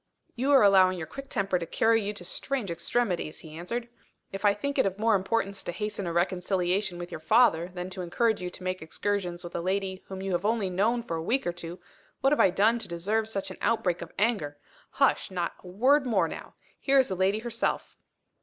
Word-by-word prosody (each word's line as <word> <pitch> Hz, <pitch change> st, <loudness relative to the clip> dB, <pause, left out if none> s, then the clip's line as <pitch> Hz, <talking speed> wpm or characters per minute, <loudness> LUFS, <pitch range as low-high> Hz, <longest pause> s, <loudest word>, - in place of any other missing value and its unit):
"You 260 Hz, +3 st, -1 dB
are 275 Hz, -4 st, +7 dB
allowing 190 Hz, -2 st, +5 dB
your 160 Hz, -, -4 dB
quick 275 Hz, -, -9 dB
temper 195 Hz, -2 st, 0 dB
to 170 Hz, -, -4 dB
carry 225 Hz, +5 st, +3 dB
you 205 Hz, 0 st, -2 dB
to 180 Hz, -4 st, -7 dB
strange 235 Hz, +1 st, -2 dB
extremities," 180 Hz, -2 st, -1 dB
he 155 Hz, -1 st, -11 dB
answered. 230 Hz, +9 st, -4 dB, 0.4 s
"If 195 Hz, +2 st, -4 dB
I 205 Hz, 0 st, +5 dB
think 280 Hz, +6 st, -2 dB
it 235 Hz, -, +4 dB
of 190 Hz, 0 st, -3 dB
more 225 Hz, +1 st, +3 dB
importance 200 Hz, 0 st, 0 dB
to -, -, -4 dB
hasten 210 Hz, 0 st, -4 dB
a -, -, -1 dB
reconciliation 180 Hz, +2 st, 0 dB
with 175 Hz, 0 st, -7 dB
your -, -, -5 dB
father 165 Hz, -1 st, +4 dB
than 180 Hz, 0 st, -6 dB
to 185 Hz, -, -5 dB
encourage 220 Hz, +5 st, +1 dB
you 180 Hz, -, -3 dB
to 180 Hz, -, -10 dB
make 185 Hz, 0 st, -2 dB
excursions 180 Hz, +1 st, -2 dB
with 175 Hz, -, -8 dB
a 170 Hz, -, -1 dB
lady 190 Hz, +1 st, -2 dB
whom 190 Hz, -1 st, -6 dB
you 195 Hz, -, -2 dB
have 175 Hz, 0 st, 0 dB
only 210 Hz, -3 st, 0 dB
known 225 Hz, +6 st, +1 dB
for 165 Hz, -8 st, -3 dB
a -, -, -3 dB
week 245 Hz, +11 st, 0 dB
or 175 Hz, -, -1 dB
two, 175 Hz, 0 st, -7 dB, 0.4 s
what 270 Hz, +2 st, +4 dB
have -, -, 0 dB
I -, -, +6 dB
done 220 Hz, +6 st, +3 dB
to 225 Hz, -, -3 dB
deserve 210 Hz, +6 st, -1 dB
such 195 Hz, -3 st, -3 dB
an -, -, -9 dB
outbreak 185 Hz, -7 st, +1 dB
of 170 Hz, -, -7 dB
anger? 195 Hz, -9 st, 0 dB, 0.3 s
Hush! -, -, +2 dB
Not 175 Hz, -2 st, -2 dB
a -, -, -11 dB
word 260 Hz, +9 st, +3 dB
more 235 Hz, -, +2 dB
now! -, -, -9 dB, 0.2 s
Here 275 Hz, 0 st, +3 dB
is 265 Hz, -, +4 dB
the 190 Hz, -, -1 dB
lady 190 Hz, +3 st, +2 dB
herself." 230 Hz, +1 st, -2 dB
195 Hz, 230 wpm, -28 LUFS, 175-225 Hz, 0.4 s, are